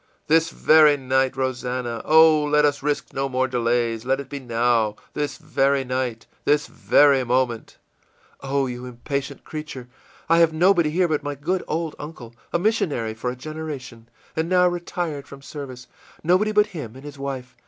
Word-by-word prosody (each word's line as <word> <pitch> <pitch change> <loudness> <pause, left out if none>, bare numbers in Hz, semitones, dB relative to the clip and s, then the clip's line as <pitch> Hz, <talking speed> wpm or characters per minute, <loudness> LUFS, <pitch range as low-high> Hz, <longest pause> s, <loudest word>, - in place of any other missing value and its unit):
î 155 - +1
ìThis 165 0 +2
very 155 -2 +5
night, 130 0 0
Rosannah! 125 -2 -2
Oh, 160 -1 +6
let 150 0 +3
us 145 -1 0
risk 145 +1 -2
no 135 0 -1
more 130 0 +1
delays. 120 -2 0
Let 135 +2 0
it 140 -2 -7
be 140 - -5
now! 115 -3 +1 0.2
this 145 -1 -3
very 140 -3 +1
night, 125 -3 -3 0.2
this 150 0 +2
very 140 -3 +4
moment!î 125 +2 -4
ìOh, 135 -2 0
you 125 +1 -7
impatient 140 +3 -5
creature! 150 -5 -7 0.4
I 165 +1 +4
have 165 -1 +4
nobody 175 -1 +4
here 175 +3 +2
but 155 -2 0
my 145 0 -4
good 175 +7 -2
old 160 0 -2
uncle, 140 -6 -9 0.2
a - - +2
missionary 170 - 0
for 115 +3 -4
a 125 - -4
generation, 135 -5 -7 0.3
and 160 +1 -1
now 180 -1 +4
retired 175 -4 -3
from 140 0 -12
service 135 -4 -8 0.4
nobody 185 +6 +3
but 210 0 +4
him 130 -9 -7
and 135 - -12
his 145 -1 -9
wife. 135 -2 -5
140 Hz, 175 wpm, -23 LUFS, 125-155 Hz, 0.4 s, Oh